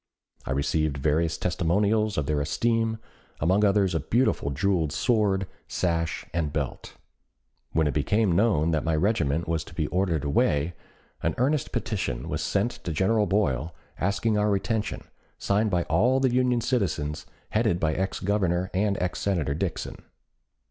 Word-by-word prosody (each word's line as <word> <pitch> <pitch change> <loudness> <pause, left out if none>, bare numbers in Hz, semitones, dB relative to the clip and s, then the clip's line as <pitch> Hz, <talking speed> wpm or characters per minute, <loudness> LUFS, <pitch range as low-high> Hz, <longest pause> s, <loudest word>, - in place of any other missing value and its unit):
I - - -2
received 75 +2 0
various 80 +4 +1
testimonials 100 +5 +1
of 75 - 0
their 75 0 0
esteem, 115 +7 0 0.4
among 95 +7 +2
others 100 -2 +3
a 80 - +1
beautiful 115 - +1
jeweled 80 +1 0
sword, 100 - +1 0.2
sash, 85 -2 -1
and 80 -3 -1
belt. - - -4 0.8
When 80 0 +2
it 75 - 0
became 100 +7 +2
known 85 -4 +2
that 80 -2 0
my 80 -1 +1
regiment 80 -4 +1
was 80 -1 -1
to 80 - -13
be 80 - 0
ordered 90 -5 0
away, 75 +2 +1 0.5
an - - 0
earnest 135 +3 +1
petition 100 - -3
was - - -2
sent 100 +5 0
to 85 - -3
General 100 +6 +2
Boyle 80 -6 0 0.2
asking 105 +2 +1
our 105 0 +2
retention, 105 +2 -1 0.3
signed 105 +2 +1
by 90 -3 +1
all 115 +13 +2
the 130 -2 +2
Union 125 -1 +2
citizens, 80 - -1 0.2
headed 85 - +1
by 80 -2 +1
ex 95 +3 -2
Governor 95 -2 0
and 100 +1 +1
ex 90 0 -2
Senator 85 -8 0
Dixon. 75 - -4
90 Hz, 155 wpm, -26 LUFS, 80-105 Hz, 0.8 s, others